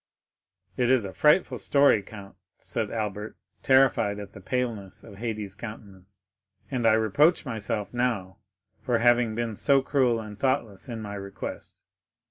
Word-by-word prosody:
"It 125 -1 +2
is 130 -5 +3
a 95 - -6
frightful 150 +5 +3
story, 140 -7 +4
count," 100 -1 -12 0.2
said - - -4
Albert, 105 -1 -4 0.2
terrified 130 -6 +3
at 100 -1 -9
the 100 - -11
paleness 115 -3 -3
of 100 -3 -12
Haydée's 110 -3 -4
countenance, 100 -2 -11 0.5
"and 120 -4 +1
I 110 - +6
reproach 140 +11 +3
myself 110 -3 -4
now 115 -7 -1 0.4
for 125 -3 +1
having 120 -1 +3
been 115 -2 -2
so 135 +4 +3
cruel 130 -5 +2
and 105 -2 -9
thoughtless 130 -6 -1
in 115 -2 -5
my 100 -1 -6
request." 100 -1 -7
110 Hz, 145 wpm, -26 LUFS, 100-125 Hz, 0.5 s, I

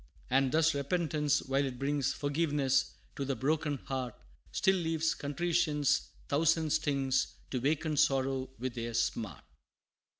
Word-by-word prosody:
And 135 -1 +3
thus, 160 +2 +4
repentance, 150 0 0
while 135 +1 +1
it 130 -2 -3
brings 140 +1 0
Forgiveness 145 -2 +1 0.2
to 140 - -3
the 135 0 -1
broken 150 +3 0
heart, 130 -4 -3 0.4
Still 190 0 +3
leaves 160 -1 0
contrition's 150 -1 +1 0.2
thousand 160 +1 +2
stings 140 -4 +1 0.2
To 130 - 0
waken 155 +4 0
sorrow 135 -2 +2
with 125 +1 -3
their 115 -1 -4
smart. 110 - -1
145 Hz, 130 wpm, -32 LUFS, 135-155 Hz, 0.4 s, thus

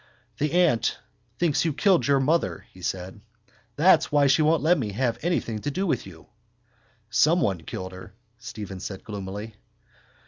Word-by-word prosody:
—The 150 +2 0
aunt 175 -10 +2 0.4
thinks 165 -4 +1
you 160 -2 0
killed 185 +2 +3
your 140 -1 +4
mother, 135 - 0
he 90 - -15
said. 95 +2 -4 0.5
That's 175 +6 +4
why 145 -1 +4
she 135 +3 +4
won't 155 +1 +3
let 170 +3 +5
me 105 -6 -3
have 120 +1 -1
anything 155 -10 -1
to 145 - -3
do 185 +7 -2
with 165 - -1
you. 80 -4 -13 0.9
—Someone 125 - +2
killed 95 +4 -6
her, 95 +2 -12 0.2
Stephen 105 -5 -7
said 95 0 -7
gloomily. 105 +1 -6
125 Hz, 160 wpm, -25 LUFS, 95-155 Hz, 0.9 s, let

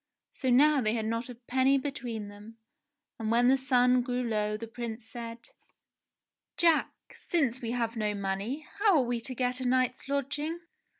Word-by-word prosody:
So 260 - -2
now 285 +3 +5
they 215 -1 +1
had 220 -2 -2
not 230 +2 -2
a 245 - -7
penny 260 +3 +2
between 250 -6 -4
them, 205 +2 -12 0.6
and 220 -1 -2
when 240 +2 +4
the 265 - +6
sun 255 -1 +3
grew 250 0 -2
low 210 -2 -1
the 230 - -6
Prince 225 0 -6
said: 230 0 -8 1.1
"Jack! 335 -2 +4 0.2
Since 270 -8 0
we 230 - -3
have 235 -1 -1
no 210 -2 -1
money 200 +9 -3
how 405 -3 +5
are 265 - +3
we 240 -1 -2
to 255 +2 -5
get 250 0 -1
a 255 - 0
night's 255 +1 0
lodging 290 +4 -2
245 Hz, 175 wpm, -29 LUFS, 225-265 Hz, 1.1 s, the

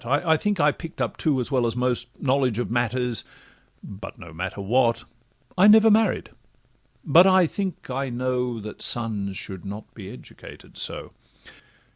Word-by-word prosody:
I 145 +7 +2
think 205 +4 -1
I 150 0 +5
pick'd 165 +3 -10
up - - -1
too, 150 -5 +1
as 125 - -3
well 125 -3 +2
as 115 - -2
most, 125 -1 0
Knowledge 130 -4 +1
of 120 - -2
matters—but 120 -4 -5
no 85 -3 -12
matter 95 +4 -5
what— 115 +4 +2 0.5
I 185 +3 +6
never 220 +1 +7
married—but, 190 -5 +1
I 185 -1 +5
think, 190 +1 -4
I 135 +1 -2
know 125 -1 -2
That 105 0 -8
sons 105 -5 -2
should 95 -2 -7
not 100 +2 -8
be 100 -4 -9
educated 125 - -13
so. - - -4
125 Hz, 150 wpm, -24 LUFS, 110-155 Hz, 0.5 s, never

